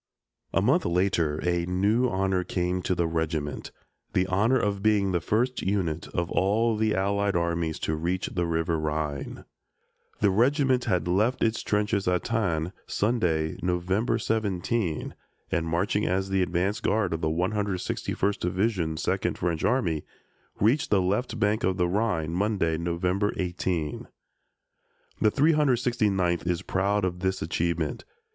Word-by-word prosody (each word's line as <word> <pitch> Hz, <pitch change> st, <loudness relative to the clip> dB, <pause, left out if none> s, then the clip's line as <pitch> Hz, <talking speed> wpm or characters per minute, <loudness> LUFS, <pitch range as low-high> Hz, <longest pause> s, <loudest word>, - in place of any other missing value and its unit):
A 95 Hz, -, +1 dB
month 150 Hz, -, +3 dB
later 85 Hz, -4 st, +1 dB
a 85 Hz, -1 st, +1 dB
new 105 Hz, +7 st, +2 dB
honor 95 Hz, -2 st, 0 dB
came 90 Hz, 0 st, -1 dB
to 90 Hz, -, 0 dB
the 85 Hz, -, +1 dB
regiment 80 Hz, -3 st, -2 dB, 0.4 s
the 90 Hz, -, +2 dB
honor 105 Hz, +8 st, +2 dB
of 100 Hz, -4 st, -1 dB
being 100 Hz, -2 st, +2 dB
the 90 Hz, -2 st, 0 dB
first 120 Hz, +9 st, 0 dB
unit 90 Hz, -5 st, -1 dB
of 85 Hz, 0 st, -3 dB
all 110 Hz, +4 st, +2 dB
the 110 Hz, 0 st, +1 dB
Allied 100 Hz, +1 st, 0 dB
armies 85 Hz, -2 st, 0 dB
to 80 Hz, -, -1 dB
reach 85 Hz, +4 st, -1 dB
the 85 Hz, -1 st, -2 dB
River 80 Hz, 0 st, 0 dB
Rhine. 75 Hz, -2 st, -3 dB, 0.7 s
The 100 Hz, -2 st, +3 dB
regiment 130 Hz, +4 st, +2 dB
had 90 Hz, -1 st, 0 dB
left 105 Hz, +8 st, +1 dB
its 110 Hz, 0 st, +1 dB
trenches 105 Hz, -1 st, 0 dB
at 90 Hz, -1 st, +1 dB
Thann, 90 Hz, -7 st, -1 dB
Sunday, 90 Hz, -9 st, 0 dB
November 95 Hz, +6 st, 0 dB
17, 105 Hz, -4 st, -1 dB, 0.4 s
and, 85 Hz, -3 st, 0 dB
marching 90 Hz, +5 st, 0 dB
as 95 Hz, +1 st, 0 dB
the 95 Hz, -1 st, +1 dB
advance 90 Hz, +4 st, 0 dB
guard 100 Hz, -4 st, +1 dB
of 80 Hz, -, -3 dB
the 80 Hz, -, +1 dB
161st 100 Hz, +2 st, -1 dB
Division, 90 Hz, -3 st, 0 dB
Second -, -, -1 dB
French 85 Hz, -2 st, -1 dB
Army, 85 Hz, -, +1 dB, 0.6 s
reached 120 Hz, +8 st, +2 dB
the 100 Hz, -, +4 dB
left 105 Hz, +6 st, -1 dB
bank 105 Hz, +2 st, +1 dB
of 95 Hz, 0 st, +1 dB
the 90 Hz, -1 st, +2 dB
Rhine, 90 Hz, -5 st, 0 dB
Monday, 95 Hz, -3 st, +1 dB
November 90 Hz, +5 st, 0 dB
18. 90 Hz, -4 st, -2 dB, 1.1 s
The 110 Hz, -, +5 dB
369th 120 Hz, -, +2 dB
is 90 Hz, -1 st, 0 dB
proud 100 Hz, +1 st, 0 dB
of 90 Hz, -1 st, -3 dB
this 95 Hz, -1 st, -1 dB
achievement. 85 Hz, -1 st, -1 dB
95 Hz, 145 wpm, -27 LUFS, 85-105 Hz, 1.1 s, The